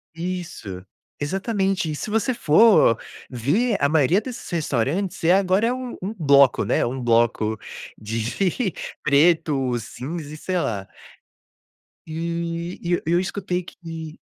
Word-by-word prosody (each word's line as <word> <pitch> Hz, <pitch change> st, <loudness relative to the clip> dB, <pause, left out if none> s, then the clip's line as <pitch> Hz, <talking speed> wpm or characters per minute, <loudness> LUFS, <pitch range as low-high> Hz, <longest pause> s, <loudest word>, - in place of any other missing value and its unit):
Isso, 165 Hz, -, -5 dB, 0.4 s
exatamente. 190 Hz, +1 st, -1 dB
E -, -, -3 dB
se 210 Hz, -, -5 dB
você 225 Hz, +4 st, +1 dB
for 170 Hz, -, +5 dB, 0.3 s
ver, 175 Hz, -, +1 dB
a 140 Hz, -, +3 dB
maioria 160 Hz, +5 st, +3 dB
desses 250 Hz, +1 st, -8 dB
restaurantes 170 Hz, -, -1 dB
é 175 Hz, +2 st, +5 dB
agora, 195 Hz, +3 st, +3 dB
é 245 Hz, -, +1 dB
um 255 Hz, -1 st, -5 dB
um 200 Hz, +4 st, -3 dB
bloco, 140 Hz, -4 st, +5 dB
né, -, -, +1 dB
um 130 Hz, +2 st, -3 dB
bloco 115 Hz, -2 st, +2 dB, 0.4 s
de 125 Hz, -, -1 dB, 0.3 s
preto, 140 Hz, -4 st, +3 dB
cinza 150 Hz, +7 st, -7 dB
e -, -, -7 dB
sei 185 Hz, +3 st, -2 dB
lá. 100 Hz, -, -2 dB, 1.2 s
E 170 Hz, +2 st, -4 dB
e 175 Hz, 0 st, -2 dB
eu 175 Hz, -, +1 dB
eu 170 Hz, +2 st, +3 dB
escutei 185 Hz, -1 st, -2 dB
que 165 Hz, -2 st, -9 dB
165 Hz, 135 wpm, -23 LUFS, 140-190 Hz, 1.2 s, for